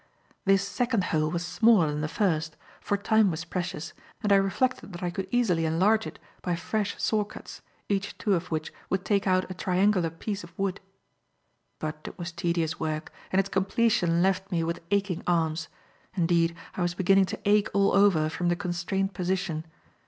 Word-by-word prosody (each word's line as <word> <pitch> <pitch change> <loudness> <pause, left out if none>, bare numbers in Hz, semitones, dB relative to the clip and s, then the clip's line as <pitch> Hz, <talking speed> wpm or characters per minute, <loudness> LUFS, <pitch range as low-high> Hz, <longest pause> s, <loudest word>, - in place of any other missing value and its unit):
This 195 0 +3
second 235 -1 0
hole 155 -1 +2
was 170 +1 -2
smaller 220 -1 +4
than 150 0 -2
the 155 - -1
first, 160 -4 0 0.2
for 205 - -1
time 215 0 +3
was 165 -1 -4
precious, 175 -2 -4 0.3
and 205 -1 +4
I - - +7
reflected 200 +2 0
that 175 - -7
I 175 - -1
could 190 +1 -4
easily 200 -9 +2
enlarge 190 +8 +2
it - - -9 0.2
by 175 -2 -1
fresh 205 +4 -2
saw 215 -1 +2
cuts, 205 - -11 0.3
each 200 0 -2
two 205 - +1
of 180 -1 -1
which 155 -1 -3 0.2
would 190 0 -1
take 200 -1 +1
out 185 0 +3
a - - -2
triangular 185 -1 +2
piece 195 +5 -5
of 170 0 -14
wood. 195 0 -1 1.0
But 155 0 -4
it - - -8
was 170 -1 -5
tedious 170 -1 -1
work, 155 0 -3 0.2
and 185 - +3
its 195 0 +1
completion 190 -3 +2
left 195 +1 0
me 170 -2 +1
with 170 +1 -3
aching 200 -3 0
arms; 165 -2 +1 0.5
indeed, 170 -1 +2 0.2
I - - -4
was 175 0 0
beginning 195 +1 +4
to - - -5
ache 205 0 +4
all 200 0 +3
over 195 -6 +4
from 175 +2 -1
the 175 - +2
constrained 180 +3 -2
position. 180 -3 -2
185 Hz, 185 wpm, -27 LUFS, 170-200 Hz, 1.0 s, I